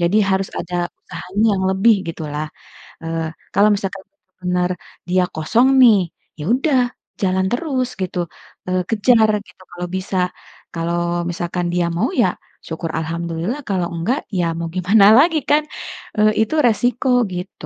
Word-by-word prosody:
jadi 175 +4 +2
harus 190 0 +1
ada 180 - -5 0.2
usahanya 205 +5 -2
yang 190 - -1
lebih 205 +4 +4
gitulah, 155 -2 -4 0.6
eee, 165 0 -2 0.2
kalau 205 +1 +5
misalkan 195 -1 -4 0.4
bener 180 0 0 0.4
dia 185 0 +3
kosong 220 +11 +2
nih 225 -5 +8 0.4
ya 150 - -4
udah 270 0 +2 0.4
jalan 190 0 +1
terus 255 -1 -1
gitu, 180 -1 -3 0.5
eee, 185 0 +1
kejar 225 0 +4 0.2
gitu - - -20
kalau 175 0 -5
bisa 190 0 -3 0.6
kalau 170 +1 -1 0.3
misalkan 175 0 -2
dia 175 -1 +1
mau - - +2
ya - - +4 0.4
syukur 160 0 -4
alhamdulillah 170 - -3
kalau 180 -3 0
enggak 225 - 0 0.2
ya 175 - +2
mau 170 0 -3
gimana 195 +3 +5
lagi 320 +3 +5
kan? 300 +1 +4 0.5
Eee, 215 0 +5 0.2
itu 315 - -3
resiko 245 +2 +1 0.2
gitu, 180 +2 -7
185 Hz, 145 wpm, -19 LUFS, 170-225 Hz, 0.6 s, nih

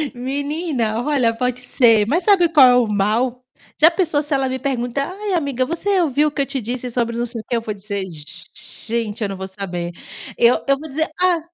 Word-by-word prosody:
Menina! 270 -3 -2
Olha, 260 -6 +1
pode 250 +1 -2
ser, 230 -4 +4
mas 335 +8 +1
sabe 370 -5 +4
qual 285 -6 +7
é 245 - +5
o 245 -3 +3
mal? 225 +5 0 0.4
Já 320 +2 +8
pensou 330 -5 +1
se 295 0 -2
ela 270 -1 +1
me 260 0 -3
perguntar: 265 +2 -2
"Ai, 405 0 -4
amiga 280 -6 0
você 370 +5 0
ouviu 300 -1 +2
o - - -17
que 285 - -2
eu - - +1
te 270 -2 -4
disse 245 +3 -4
sobre 235 -1 -1
não 240 - -1
sei 230 -2 -4
o - - -20
que?", 240 - -2
eu 230 - 0
vou 215 -2 -4
dizer 200 -1 -4
gente 210 +8 -4
eu 200 - -1
não 195 - -5
vou 190 0 -5
saber. 180 -3 -5 0.5
Eu 235 +1 +4
eu 275 0 +3
vou 315 0 -9
dizer: 315 +3 -1
"Ah" 360 -2 +3
250 Hz, 225 wpm, -20 LUFS, 230-295 Hz, 0.5 s, Já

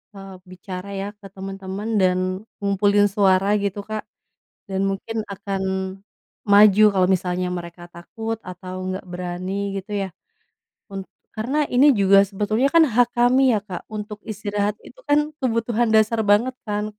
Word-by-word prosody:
eee, 195 0 -10 0.2
bicara 185 +1 -8
ya 195 - -3
ke 200 - -11
teman-teman 195 +1 -6
dan 180 -1 +3 0.4
ngumpulin 200 +1 +3
suara 195 -1 +3 0.2
gitu 200 0 -2
Kak. 215 0 -3 0.7
Dan 190 0 -1
mungkin 195 +4 -4 0.2
akan, 195 0 -4 0.9
maju 205 0 +7
kalau 185 -2 +3
misalnya 180 0 -2
mereka 170 0 -9
takut 225 +6 -5
atau 185 +1 -8
nggak 185 +1 -4
berani 180 +1 -5 0.2
gitu 195 +2 -6
ya. 195 - -2 0.9
Un 195 - -4 0.4
karena 240 +7 -2 0.2
ini 260 +4 +6
juga 195 0 +5
sebetulnya 215 +6 0
kan 330 -1 +7
hak 245 0 +4
kami 245 +2 +4
ya - - +2
Kak 180 -4 -6
untuk 210 0 -6
istirahat 205 0 -2
itu - - -15
kan 290 0 +5 0.2
kebutuhan 235 -2 0
dasar 220 +1 +3
banget 235 +5 +3
kan, 210 0 -1
200 Hz, 145 wpm, -22 LUFS, 190-220 Hz, 0.9 s, maju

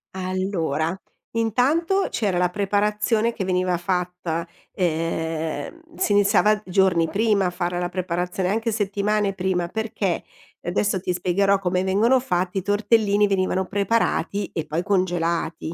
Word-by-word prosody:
Allora, 185 -4 -1 0.4
intanto 295 - +2
c'era 200 -5 -1
la 180 0 +2
preparazione 210 +3 +1
che 205 -5 -4
veniva 180 -1 +1
fatta, 180 -2 -2 0.3
ehm 165 -2 -1 0.5
si - - 0
iniziava 205 +1 +4
giorni 180 -3 +3
prima 210 -2 +2
a 180 - +2
fare 175 0 -2
la 175 - -1
preparazione, 180 0 -2
anche 225 +3 0
settimane 205 -1 0
prima, 180 -2 -1
perché 220 -4 -2 0.4
adesso 190 +2 0
ti 180 0 -2
spiegherò 195 +3 +2
come 185 -1 0
vengono 225 +7 +3
fatti, 190 -6 -1
tortellini 205 +1 +2
venivano 190 -1 0
preparati 205 -1 0
e 160 -2 -3
poi 165 +4 -2
congelati. 170 -4 -1
190 Hz, 125 wpm, -23 LUFS, 180-210 Hz, 0.5 s, iniziava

